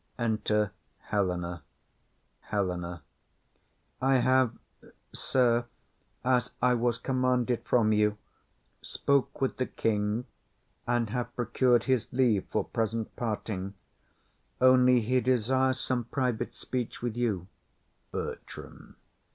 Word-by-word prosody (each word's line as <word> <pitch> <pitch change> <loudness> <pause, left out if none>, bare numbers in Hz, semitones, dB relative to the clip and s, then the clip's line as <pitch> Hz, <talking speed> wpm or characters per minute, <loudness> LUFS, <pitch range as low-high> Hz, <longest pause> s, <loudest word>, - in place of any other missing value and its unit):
Enter 110 -3 +1 0.4
Helena. 90 -3 -1 0.9
HELENA. 90 -5 -2 1.0
I 135 0 +4
have, 130 -2 +3 0.6
sir, 120 -2 +2 0.6
as 125 -1 +2
I 125 0 +4
was 120 -1 +1
commanded 125 -1 0
from 110 -3 +3
you, 105 0 +2 0.6
Spoke 140 -1 0
with 135 - 0
the 130 - -1
king, 105 +2 -1 0.6
and 120 -3 +1
have 120 0 -3
procur'd 120 0 +2
his 130 -3 0
leave 120 -6 +2
For - - 0
present 115 0 -2
parting; 105 -4 -3 0.8
only 125 -1 +6
he 125 +3 +1
desires 130 +2 +2
Some 125 -2 -1
private 125 -2 -2
speech 125 -2 -4
with 120 -2 -2
you. 110 -8 -1 0.7
BERTRAM. - - -7
120 Hz, 100 wpm, -29 LUFS, 105-125 Hz, 1.0 s, only